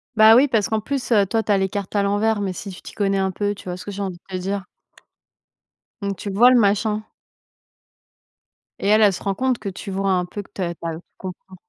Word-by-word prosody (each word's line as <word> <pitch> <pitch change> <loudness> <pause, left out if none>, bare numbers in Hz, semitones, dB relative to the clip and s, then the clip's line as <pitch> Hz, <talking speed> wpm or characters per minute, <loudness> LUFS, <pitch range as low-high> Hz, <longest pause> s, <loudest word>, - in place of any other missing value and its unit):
Bah, 220 0 +8
oui, 275 +3 +5
parce 225 -6 +1
qu'en 220 - +1
plus, 260 +4 -4
heu, 205 -3 +5
toi, 225 +3 0
tu 215 - -1
as 200 - +4
les 190 0 +1
cartes 200 -1 -5
à 205 - +2
l'envers, 205 +2 +1
mais 195 -2 -2
si 200 - -7
tu 185 - -10
t'y - - -11
connais 195 -1 0
un 190 0 +1
peu, 205 +2 -1
tu 195 - -13
vois, 180 -1 -4
ce 180 - -9
que 205 - -6
j'ai 200 0 -5
envie 190 -2 -3
de - - -32
te - - 0
dire? 195 +1 -3 1.4
Donc 200 0 -2
tu 205 - -5
le 195 - -5
vois, 245 +3 +8
le 250 - +6
machin 210 +1 +1 1.7
et - - -2
elle, 215 +1 +5
elle 205 -3 +5
se - - -7
rend 195 -1 -1
compte 255 +2 +1
que 200 - -4
tu 195 +2 -8
vois 195 0 0
un 180 -1 +1
peu 205 +3 -6
que - - -23
tu - - -6
as 170 -1 -1
tu 170 - -11
as 165 - -2
tu 160 - -8 0.2
comprends. 185 0 -9
200 Hz, 270 wpm, -22 LUFS, 190-215 Hz, 1.7 s, Bah